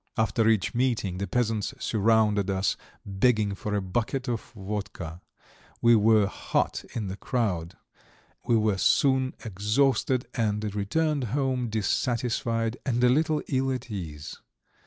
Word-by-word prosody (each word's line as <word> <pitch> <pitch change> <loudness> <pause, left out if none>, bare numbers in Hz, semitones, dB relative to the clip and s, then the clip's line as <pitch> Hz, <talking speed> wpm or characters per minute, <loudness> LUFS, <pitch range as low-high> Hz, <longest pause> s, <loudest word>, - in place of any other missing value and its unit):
After 110 0 +2
each 110 +1 +1
meeting 115 -7 0
the 100 - -2
peasants 110 -1 -1
surrounded 105 -2 +2
us, 95 0 +1 0.3
begging 105 +1 +2
for 105 +1 -3
a 100 - -1
bucket 120 +7 -2
of 120 -2 -1
vodka; 95 -5 -5 0.6
we 120 0 +6
were 110 -1 +5
hot 100 - -1
in 110 -4 -2
the 95 +1 -5
crowd; 95 -11 -2 0.7
we 120 - +4
were 105 -3 +1
soon 130 +2 +3
exhausted, 120 +5 +1
and 105 -3 -1
returned 140 +8 0
home 130 -4 0
dissatisfied 115 +1 -1
and 125 -2 0
a 125 - +6
little 155 +3 +2
ill 135 -1 0
at 125 -2 -5
ease. 80 -7 -6
110 Hz, 135 wpm, -27 LUFS, 100-125 Hz, 0.7 s, we